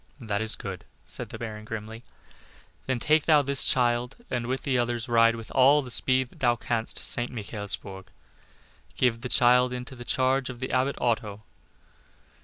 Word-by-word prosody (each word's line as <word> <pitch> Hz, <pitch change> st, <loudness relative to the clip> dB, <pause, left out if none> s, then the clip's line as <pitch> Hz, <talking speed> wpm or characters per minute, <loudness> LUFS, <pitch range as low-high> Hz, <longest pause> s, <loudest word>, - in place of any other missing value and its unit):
"That 105 Hz, -4 st, -2 dB
is 110 Hz, -1 st, +2 dB
good," 95 Hz, -3 st, -7 dB, 0.2 s
said -, -, -4 dB
the -, -, -8 dB
Baron, 110 Hz, -2 st, -7 dB
grimly. 110 Hz, +1 st, -7 dB, 0.8 s
"Then 130 Hz, -1 st, 0 dB
take 155 Hz, +5 st, +2 dB
thou 150 Hz, -3 st, +5 dB
this 140 Hz, 0 st, +2 dB
child, 120 Hz, 0 st, +1 dB, 0.2 s
and 120 Hz, -2 st, -2 dB
with 130 Hz, +1 st, -3 dB
the 135 Hz, -, 0 dB
others 120 Hz, -1 st, -1 dB
ride 115 Hz, -1 st, +4 dB
with 115 Hz, -1 st, -9 dB
all 140 Hz, +2 st, +5 dB
the 125 Hz, -, -10 dB
speed 130 Hz, +1 st, +1 dB
that -, -, -20 dB
thou 120 Hz, -2 st, +3 dB
canst 115 Hz, -1 st, -3 dB
to -, -, -2 dB
St. 120 Hz, 0 st, +2 dB
Michaelsburg. 100 Hz, -3 st, -4 dB, 0.9 s
Give 115 Hz, -2 st, +1 dB
the 125 Hz, -, -5 dB
child 125 Hz, +1 st, +4 dB
into 125 Hz, +1 st, -6 dB
the 120 Hz, -, -9 dB
charge 130 Hz, +2 st, +1 dB
of 125 Hz, -2 st, -8 dB
the 130 Hz, -, -4 dB
Abbot 130 Hz, +2 st, +1 dB
Otto. 110 Hz, -3 st, -2 dB
120 Hz, 180 wpm, -26 LUFS, 115-130 Hz, 0.9 s, thou